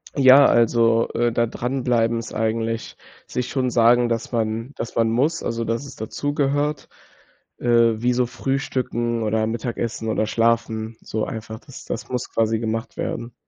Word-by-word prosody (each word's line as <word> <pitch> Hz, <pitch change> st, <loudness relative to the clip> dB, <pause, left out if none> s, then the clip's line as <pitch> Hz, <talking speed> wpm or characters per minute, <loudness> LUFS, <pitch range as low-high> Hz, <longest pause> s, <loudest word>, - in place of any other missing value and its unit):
Ja, 135 Hz, 0 st, +8 dB
also, 115 Hz, 0 st, +3 dB
äh, 120 Hz, 0 st, 0 dB
da 115 Hz, +1 st, +2 dB
dran 125 Hz, +3 st, -3 dB
bleiben 115 Hz, -2 st, +2 dB
ist 115 Hz, -, -6 dB
eigentlich 115 Hz, 0 st, -2 dB, 0.3 s
sich 125 Hz, -1 st, -3 dB
schon 130 Hz, -2 st, 0 dB
sagen, 120 Hz, 0 st, +4 dB
dass 115 Hz, +1 st, -2 dB
man 115 Hz, +2 st, -2 dB
dass 115 Hz, -, -6 dB
man 115 Hz, -1 st, +2 dB
muss, 145 Hz, +8 st, +1 dB
also, 115 Hz, 0 st, -2 dB
dass 115 Hz, +5 st, -2 dB
es -, -, -10 dB
dazu 145 Hz, +6 st, -3 dB
gehört, 145 Hz, +1 st, 0 dB, 0.7 s
äh, 115 Hz, -2 st, +3 dB
wie 125 Hz, +1 st, +2 dB
so 125 Hz, 0 st, +2 dB
Frühstücken 120 Hz, -2 st, -2 dB
oder 110 Hz, +1 st, +1 dB
Mittagessen 115 Hz, 0 st, -3 dB
oder 110 Hz, -, +1 dB
Schlafen, 115 Hz, -1 st, 0 dB
so 110 Hz, 0 st, -3 dB
einfach, 110 Hz, 0 st, -7 dB
das 135 Hz, 0 st, -12 dB
das -, -, -5 dB
muss 125 Hz, -1 st, -3 dB
quasi 115 Hz, 0 st, +1 dB
gemacht 115 Hz, 0 st, -3 dB
werden. 120 Hz, 0 st, -4 dB
115 Hz, 165 wpm, -22 LUFS, 115-125 Hz, 0.7 s, Ja